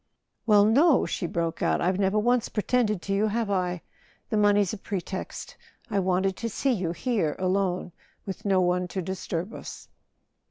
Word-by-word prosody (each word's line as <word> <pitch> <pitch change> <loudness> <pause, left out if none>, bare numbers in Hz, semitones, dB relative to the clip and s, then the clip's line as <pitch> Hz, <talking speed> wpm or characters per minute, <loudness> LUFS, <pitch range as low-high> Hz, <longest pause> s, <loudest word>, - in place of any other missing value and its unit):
"Well, 205 -2 +6
no!" 275 +7 +4
she 175 - -3
broke 165 -1 -2
out. - - +2
"I've 185 +2 0
never 195 +1 +2
once 240 +2 +2
pre¬ 210 - -3
tended 215 -7 +1
to 195 - -2
you, 205 +2 +2
have 220 -1 -1
I? 180 -2 -1 0.5
The - - +1
money's 205 -2 +3
a - - -4
pretext. 190 -1 -5 0.4
I 200 - +2
wanted 190 0 +1
to 230 - -3
see 270 +5 0
you—here, 180 -3 -1
alone, 185 -1 0 0.3
with 195 - -6
no 195 -2 +3
one 180 0 +1
to 185 +1 -4
disturb 185 +2 -4
us." - - -9
195 Hz, 170 wpm, -26 LUFS, 180-215 Hz, 0.5 s, Well